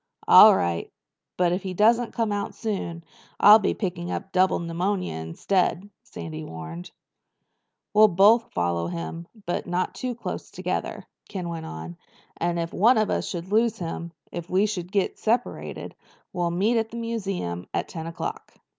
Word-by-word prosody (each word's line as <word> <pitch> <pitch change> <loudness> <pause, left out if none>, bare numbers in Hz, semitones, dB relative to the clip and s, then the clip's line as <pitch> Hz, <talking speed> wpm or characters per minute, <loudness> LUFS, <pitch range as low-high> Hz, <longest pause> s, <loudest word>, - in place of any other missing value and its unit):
"All - - +10
right. 85 -1 -1 0.5
But 180 -1 +3
if 180 +2 -1
he 185 -2 -5
doesn't 230 +4 +3
come 225 -2 0
out 205 0 -3
soon 190 -6 -4 0.4
I'll 210 +2 +9
be 195 - 0
picking 175 -4 -3
up 195 - -4
double 185 0 +3
pneumonia 180 - -2
instead," 180 - -1
Sandy 155 -1 -8
warned. 80 - -8 1.0
"We'll 215 +1 +8
both 210 +5 +4
follow 85 -1 -1
him, 85 - -5 0.2
but 175 - -2
not 180 +1 -1
too 255 -1 -4
close 235 - -6
together," - - -4 0.2
Ken 180 -3 -4
went 165 -1 -5
on. 80 +2 -8 0.4
"And 170 0 -1
if 170 0 -3
one 230 +6 +5
of 215 -1 +2
us - - -1
should 175 +1 -5
lose 225 +1 +3
him—if 170 -1 -7
we 190 +3 +3
should 185 -4 -4
get 200 -2 0
separated—we'll 220 -6 -3
meet 205 +7 +2
at 225 0 -2
the 235 - -8
museum 195 - -3
at - - -2
ten 165 -2 -6
o'clock." 165 0 -6
180 Hz, 155 wpm, -25 LUFS, 165-210 Hz, 1.0 s, All